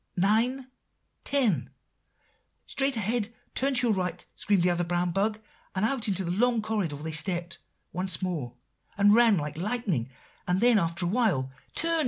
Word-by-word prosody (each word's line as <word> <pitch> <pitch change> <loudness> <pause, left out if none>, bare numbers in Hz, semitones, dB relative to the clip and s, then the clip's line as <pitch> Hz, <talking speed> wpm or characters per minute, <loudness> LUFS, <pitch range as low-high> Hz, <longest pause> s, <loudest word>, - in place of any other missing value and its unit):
"'Nine 230 +8 +2 0.6
ten' 255 - +1 1.0
"'Straight 270 -1 0
ahead! 220 +1 -1 0.2
turn 270 +1 +1
to 245 0 +3
your 220 - +2
right!' 180 -2 -3
screamed 200 -4 +1
the 180 - +3
other 175 0 0
brown 175 +1 -1
bug; 210 +4 0 0.4
and 190 +3 +1
out 235 -1 0
into 190 -2 0
the 170 - -2
long 235 +5 +2
corridor 210 -8 -2
they 155 +3 -6
stepped 170 +2 -1 0.3
once 185 +2 -1
more, 160 -11 -4 0.4
and 205 0 +5
ran 230 -3 +5
like 150 -1 -4
lightning; 190 - -1 0.4
and 180 +1 +1
then, 235 -1 +5
after 170 0 -1
awhile, 175 - +1 0.2
'Turn! 330 0 +3
195 Hz, 160 wpm, -27 LUFS, 175-230 Hz, 1.0 s, and